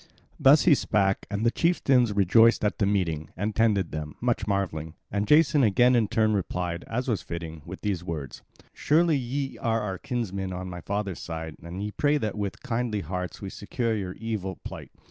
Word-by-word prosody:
Thus 140 +3 +6
he 175 - +6
spake, 100 -7 +1
and 105 +2 -2
the 115 - +4
chieftains 130 -7 +2
rejoiced 105 +3 +4
at 105 - -1
the 100 - +2
meeting, 85 -6 -1
and 100 +3 -2
tended 105 -6 +2
them, 75 -1 -5
much 120 -3 0
marvelling. 85 -6 -2 0.2
And 100 +1 -1
Jason 150 +2 +5
again 120 +3 +4
in 115 -3 +3
turn 110 +1 +2
replied, 90 -3 -2
as 125 +3 -2
was 110 -5 0
fitting, 80 -2 -7
with 95 +2 -8
these 100 -5 -2
words: 75 -7 -6 0.3
"Surely 160 +1 +3
ye 135 +1 -3
are 115 -2 0
our 95 -4 -4
kinsmen 100 -7 -3
on 90 0 -5
my 90 0 -7
father's 100 -1 -3
side, 80 -2 -6
and 85 +4 -6
ye 105 - -3
pray 145 +6 +2
that 110 -7 -2
with 100 -2 -4
kindly 120 -5 -1
hearts 90 +1 -5
we 95 - -5
succour 115 +2 -2
your 95 -4 -3
evil 105 -4 -4
plight. - - -8
105 Hz, 190 wpm, -26 LUFS, 90-115 Hz, 0.3 s, Thus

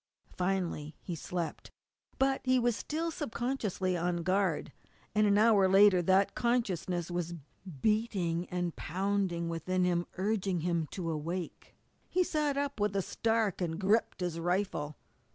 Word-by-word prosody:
Finally 180 -5 -1
he 180 - -6
slept. 170 +1 -4 0.5
But 270 0 +2
he 255 0 +3
was 240 -2 +2
still 320 +9 -2
subconsciously 235 - -2
on 175 0 -1
guard, 185 -4 +1 0.4
and 215 0 +4
an 205 0 +4
hour 210 -3 +5
later 195 -1 +6
that 190 +3 +3
consciousness 185 -8 0
was 175 -1 -2 0.5
beating 195 -6 0
and 175 -2 -2
pounding 185 -1 -1
within 180 +2 -1
him, 175 -1 +1
urging 195 -3 0
him 170 -2 0
to 170 -1 -4
awake. 165 +3 -5 0.3
He 365 - +2
sat 300 -4 0
up 280 -4 -2
with 205 -1 0
a 195 - +1
start 225 -3 0
and 165 -1 -2
gripped 205 +1 +1
his 175 -2 -2
rifle. 175 -4 -1
185 Hz, 140 wpm, -31 LUFS, 175-215 Hz, 0.5 s, later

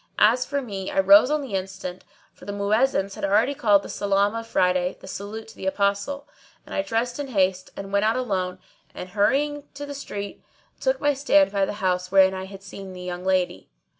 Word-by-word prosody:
As 240 +4 +4
for 280 -1 -2
me 195 -5 -5
I - - 0
rose 200 +6 +7
on 300 0 +1
the 255 -7 -7
instant, 190 -1 -4 0.3
for - - -15
the 200 - -4
Muezzins 200 0 +1
had - - -9
already 215 +7 +3
called 205 -7 +3
the - - -7
Salam 200 +1 +1
of 230 0 -5
Friday, 180 -3 +1
the - - -13
salutation 205 +3 -6
to - - -14
the 190 - -5
Apostle;[FN#628] 200 +9 0 0.4
and - - -10
I - - +1
dressed 240 -2 -2
in 285 - -3
haste 190 -6 +1
and 195 0 -7
went 200 +1 +3
out 220 +2 +2
alone 185 -7 -1 0.4
and, 180 - -7
hurrying 285 +9 +1
to 290 +1 -6
the 285 - -6
street, 205 -7 -6 0.4
took - - +1
my 290 - +2
stand 290 0 +3
by 200 -1 +2
the - - -4
house 180 0 0
wherein 190 -1 +6
I 190 0 -5
had 195 0 -11
seen 195 -1 -9
the 180 - -9
young 180 0 -5
lady. 185 - 0
200 Hz, 215 wpm, -24 LUFS, 190-250 Hz, 0.4 s, rose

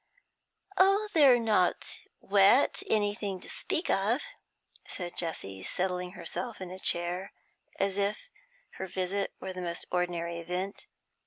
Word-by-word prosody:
'Oh, 395 +3 +5
they're 280 -6 +7
not 215 -6 +1 0.2
wet 200 +6 +4
anything 205 -2 0
to - - -9
speak 330 - -1
of,' 215 +8 +1 0.6
said 175 -2 -5
Jessie, 95 - -2
settling 180 - -2
herself 235 +2 -4
in 185 -1 -6
a 185 - -7
chair, 175 +2 0 0.5
as 195 0 0
if 200 +1 -1 0.5
her 190 - -3
visit 190 +2 -2
were 190 0 -5
the 185 - -6
most 170 -1 -2
ordinary 170 -1 -1
event. 180 +4 -4
190 Hz, 130 wpm, -30 LUFS, 180-205 Hz, 0.6 s, they're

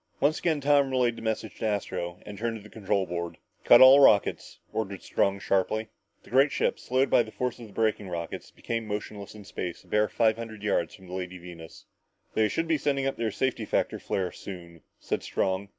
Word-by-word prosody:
Once 145 +3 +2
again 160 -4 +1
Tom 140 -1 +3
relayed 125 -2 +1
the - - -9
message 110 -1 -3
to - - -2
Astro 90 -4 -3
and 105 - -8
turned 115 +2 -2
to 105 - -13
the 105 - -14
control 100 -2 0
board. 85 -1 -4 0.3
"Cut 120 - +8
all 130 +2 +10
rockets!" 105 -7 +4 0.2
ordered 100 -3 -3
Strong 100 0 0
sharply. 110 +3 0 0.3
The - - -17
great 135 +3 +5
ship, - - 0
slowed 130 +1 +1
by - - +6
the 110 - -5
force 125 +1 -3
of 115 - -9
the 100 - -16
braking 110 -3 0
rockets, 85 -2 -5
became 115 -1 -4
motionless 105 0 -5
in 105 -2 -11
space 90 -3 -5
a - - -24
bare 105 0 +2
five 110 -1 +2
hundred 110 -2 -8
yards 85 -5 0
from 95 - -16
the 90 - -10
Lady 90 0 -5
Venus. 85 -2 -11 0.5
"They 110 -1 +3
should 165 +9 -1
be 160 -2 +1
sending 140 -1 0
up 135 - -1
their 115 -1 0
safety 130 +5 -1
factor - - -1
flare 95 -2 -2
soon," 85 -4 -10 0.2
said - - -2
Strong. 95 +1 -1
105 Hz, 215 wpm, -27 LUFS, 95-120 Hz, 0.5 s, all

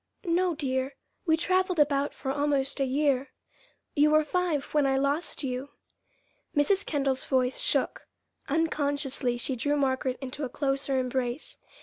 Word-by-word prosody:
"No, 350 0 +2
dear. 265 -2 -1 0.3
We 320 0 +4
traveled 370 +1 +1
about 285 -1 +3
for 265 - -4
almost 285 -1 +1
a 275 - +2
year. 275 0 +1 0.7
You 295 +1 +5
were 310 0 +5
five 325 -2 0
when 295 -2 +3
I 270 0 +2
lost 285 +4 -1
you." 260 +1 -3 0.9
Mrs. 385 +7 +3
Kendall's 275 -3 0
voice 255 -1 +1
shook. - - 0 0.4
Unconsciously 285 -5 0
she 255 +2 -2
drew 290 +5 0
Margaret 260 -2 0
into 265 +2 -5
a 265 - -2
closer 275 0 0
embrace. 255 +1 -2
280 Hz, 140 wpm, -28 LUFS, 265-300 Hz, 0.9 s, You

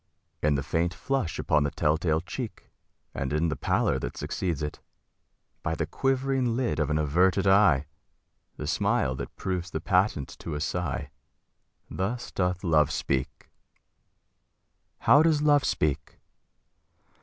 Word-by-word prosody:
In 75 -1 +2
the 70 - -1
faint 85 +4 -1
flush 135 - -2
upon 75 - +2
the 70 - 0
tell 75 +2 +1
tale 80 -1 0
cheek, 110 +6 -7 0.4
And 70 -1 -3
in 75 +3 +1
the - - -1
pallor - - +1
that - - -5
succeeds 85 -6 -2
it; 75 - -5 0.8
by - - -1
The - - -1
quivering 135 -2 0
lid 120 -8 -1
of 75 - +1
an 75 - +1
averted 90 +6 +2
eye 95 -8 +5 0.7
The - - -5
smile 65 - +1
that - - -7
proves 90 -2 -3
the 80 - -3
patent 90 - +1
to 80 - -5
a - - -3
sigh 80 -2 -3 0.8
Thus 115 +6 -3
doth 90 -1 -1
Love 75 -4 +3
speak. 65 -3 -3 1.5
How 145 - +6
does 155 -2 +3
Love 145 -2 +4
speak? 70 -1 -1
85 Hz, 145 wpm, -27 LUFS, 75-105 Hz, 1.5 s, How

